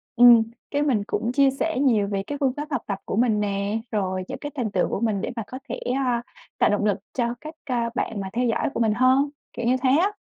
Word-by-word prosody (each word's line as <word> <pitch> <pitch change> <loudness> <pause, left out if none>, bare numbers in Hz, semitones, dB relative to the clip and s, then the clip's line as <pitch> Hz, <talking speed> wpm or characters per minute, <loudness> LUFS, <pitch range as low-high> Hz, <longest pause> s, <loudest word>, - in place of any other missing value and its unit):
ừm, 240 -1 +8 0.3
cái 290 0 +1
mình 245 -9 +2
cũng 235 0 -1
chia 275 +1 +4
sẻ 270 +1 -1
nhiều 225 -8 +3
về 195 -1 -2
cái 290 - -3
phương 265 -2 +2
pháp 295 +1 -4
học - - 0
tập 195 -1 -3
của - - -3
mình 225 -2 +2
nè, 200 +1 -1
rồi 185 -3 -1
những - - -5
cái 290 0 -6
thành 235 -7 -2
tựu 185 - +1
của - - -2
mình 215 -3 0
để - - -3
mà 225 - -3
có 255 - -7
thể, - - -4 0.2
a, 250 -3 +1 0.4
tạo - - +4
động 205 0 +1
lực 205 -2 +2 0.2
cho 235 -2 0
các, 310 +1 -8
a, 240 -3 0
bạn 215 -5 -2
mà 190 - -5
theo 245 +2 +1
dõi 225 - 0
của - - -3
mình 220 -2 +3
hơn, 260 +4 +3 0.2
kiểu 230 - -4
như 255 +2 +3
thế 260 - +4
á. 340 +10 +4
235 Hz, 265 wpm, -24 LUFS, 210-265 Hz, 0.4 s, ừm